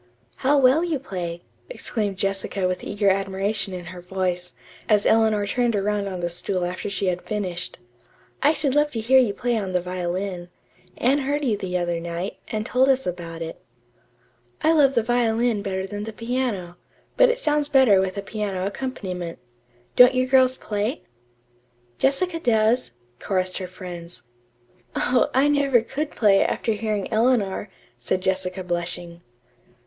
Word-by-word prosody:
"How 285 +2 +3
well 270 +4 +5
you 335 -4 0
play!" 175 -9 -5 0.3
exclaimed 210 - -3
Jessica 195 0 -1
with 180 0 -3
eager 205 -1 +1
admiration 195 +1 -1
in 180 -2 -6
her 180 - -9
voice, 180 -1 -3 0.3
as 210 -2 +4
Eleanor 220 -2 +3
turned 240 +2 0
around 205 0 0
on 185 -2 -5
the 175 - -1
stool 180 +1 -2
after 180 +3 -4
she 200 0 -2
had 180 -1 0
finished. 185 -5 -4 0.6
"I 290 - +5
should 290 -4 0
love 295 +1 +3
to 230 - -2
hear 255 +4 +5
you 220 -6 +2
play 240 +2 0
on 190 -3 -4
the 180 - +3
violin. 180 0 -4 0.5
Anne 270 +4 +2
heard 285 +2 -1
you 230 -5 +2
the 185 -2 -2
other 175 -1 -1
night, 170 +3 -4
and 215 -1 -3
told 260 +3 +3
us 265 0 +2
about 170 -2 -5
it." 165 - -8 1.0
"I 320 - +5
love 280 -4 +4
the 235 - +3
violin 235 -1 +1
better 190 -1 -3
than 205 +1 -5
the 225 - -6
piano, 230 -7 -3 0.4
but - - +6
it 485 - +1
sounds 300 -8 +1
better 260 -9 +5
with 190 +1 -3
a 200 - -3
piano 200 -3 -3
accompaniment. 190 -7 -4 0.6
Don't 250 +1 +8
you 255 0 +2
girls 260 0 +4
play?" 210 +6 -3 1.0
"Jessica 330 +5 +2
does," 230 - +2 0.3
chorused 185 -1 -1
her 185 - -5
friends. 180 -2 -8 0.7
"Oh, 250 0 +2
I 270 +2 +4
never 280 -4 +3
could 290 +6 -3
play, 205 -7 +4
after 225 - -1
hearing 215 -2 -2
Eleanor," 220 -4 +1 0.3
said 185 +10 -1
Jessica 185 0 -1
blushing. 175 -1 -4
205 Hz, 160 wpm, -23 LUFS, 185-250 Hz, 1.0 s, Don't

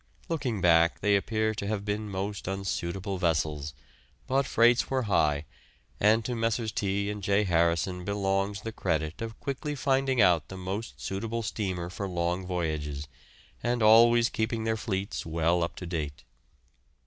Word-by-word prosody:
Looking 130 - -1
back, 85 -1 +4
they 100 +1 +3
appear 110 +2 0
to 105 -2 -4
have 105 -1 -2
been 105 0 -2
most 100 +1 -4
unsuitable 95 0 -3
vessels, 75 -4 0 0.5
but 135 +1 +1
freights 120 +1 +4
were 130 -1 0
high, 80 -7 +2 0.5
and 110 +2 +4
to 125 - -2
Messrs. 115 -1 0
T. 100 0 -1
and 105 0 -6
J. 100 +2 +2
Harrison 85 0 +1
belongs 100 0 -1
the 115 - -5
credit 80 -4 -2
of 115 -1 -6
quickly 145 +1 -3
finding 135 -2 +1
out 85 -7 +4
the 95 - -8
most 95 +5 -5
suitable 115 +4 -3
steamer 95 -5 -3
for 100 +1 -4
long 90 +1 -1
voyages, 75 -5 -3 0.5
and 120 -1 0
always 115 +2 +7
keeping 110 0 -1
their 110 0 +1
fleets 100 -2 -3
well 85 +2 +1
up 85 - -2
to 90 - -7
date. 75 -5 -4
100 Hz, 155 wpm, -28 LUFS, 85-110 Hz, 0.5 s, always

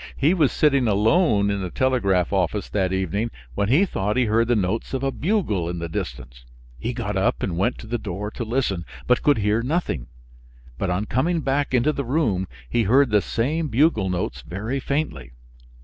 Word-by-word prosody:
He 150 +6 +3
was 155 -8 +3
sitting 140 -5 +3
alone 105 - +3
in 100 -1 -2
the 90 - -3
telegraph 100 -8 +1
office 100 +2 0
that 95 -3 0
evening 95 +4 -1 0.2
when 100 +10 0
he 155 +11 +5
thought 105 - -2
he 125 - +3
heard 115 +1 +2
the 120 - +3
notes 105 +5 -1
of 135 - -3
a 135 - +1
bugle 140 - 0
in 90 - -4
the 85 0 -4
distance; - - -6 0.4
he 120 - -2
got 115 -4 -3
up 95 - +1
and 90 - -1
went 100 +8 0
to - - -10
the 120 +2 -3
door 105 +1 -5
to 120 - -5
listen, 110 -6 -1 0.2
but 125 - +3
could 145 -3 +3
hear 105 +2 +1
nothing; 125 - -2 0.7
but 100 - -1
on 90 +4 -1
coming 160 +9 0
back 140 -1 0
into 125 +5 +3
the 140 - -2
room 115 - 0 0.2
he 115 - +1
heard 130 +4 +4
the 105 -1 +4
same 150 +11 -1
bugle 125 - +2
notes 85 -8 -3
very 105 - -4
faintly. 135 - -3
110 Hz, 195 wpm, -23 LUFS, 95-135 Hz, 0.7 s, he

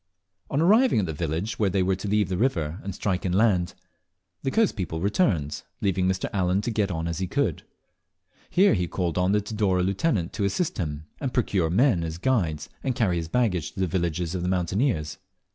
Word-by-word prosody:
On 140 - 0
arriving 220 +10 +5
at - - -1
the 80 - -4
village 85 +8 -3
where 105 -3 +3
they 95 0 +1
were 95 +1 +1
to 100 - -5
leave 105 -1 +2
the 95 - -2
river 90 - 0
and 100 -1 -5
strike 95 -2 -1
inland, 95 -1 +2 0.7
the 135 - -1
coast 220 +8 +2
people 85 -6 -3
returned, 90 - 0 0.2
leaving 95 -2 +1
Mr. 95 0 0
Allen 95 -1 +1
to 120 - -2
get 105 -2 0
on 80 -2 -2
as 85 -1 -3
he 95 - -1
could. 105 - 0 0.9
Here 195 +3 +4
he 90 -4 0
called 90 -1 -1
on 90 +1 +2
the 105 0 +3
Tidore 100 -3 0
lieutenant 95 - 0
to - - -2
assist 100 - -1
him, 75 -3 -3
and 130 -3 -3
procure 100 -9 +1
men 100 - +3
as 80 0 -4
guides 85 - 0 0.2
and 130 -2 -1
to - - -9
carry 95 -7 +2
his 80 -1 -3
baggage 90 -8 0
to - - -9
the 95 - +2
villages 85 -1 -1
of 90 - -2
the 90 - -1
mountaineers. 90 - 0
95 Hz, 210 wpm, -25 LUFS, 85-110 Hz, 0.9 s, arriving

